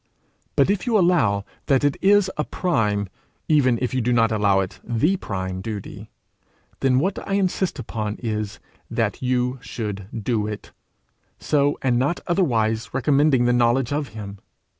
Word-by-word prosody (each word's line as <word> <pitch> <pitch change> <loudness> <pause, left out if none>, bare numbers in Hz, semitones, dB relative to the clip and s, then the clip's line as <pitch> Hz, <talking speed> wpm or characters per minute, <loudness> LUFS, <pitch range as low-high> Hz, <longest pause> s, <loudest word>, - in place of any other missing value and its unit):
But - - +4
if 205 +4 -2
you 230 -3 +3
allow 135 - +2 0.2
that 135 0 +3
it 145 -1 +2
is 200 -1 +4
a 150 - 0
prime, 105 - 0 0.4
even 130 -6 +3
if 125 - -1
you 130 - +1
do 120 +2 0
not 115 -2 +3
allow 100 -3 +3
it 95 - -6
the 120 +11 +1
prime 95 - -4
duty, 105 -1 -7 0.7
then 130 -2 +3
what 185 +8 0
I 195 - -2
insist 190 -2 0
upon 110 -4 -4
is, 105 -3 -3 0.3
that - - -1
you 125 0 0
should 100 -4 -5 0.2
do 110 -2 0
it, 105 -1 -7 0.7
so 145 -1 +1
and 125 -2 +2
not 145 +7 0
otherwise 115 - 0
recommending 135 -1 +3
the 120 - +3
knowledge 120 +2 +2
of 145 -1 -1
him. 100 -2 -7
125 Hz, 160 wpm, -23 LUFS, 110-150 Hz, 0.7 s, But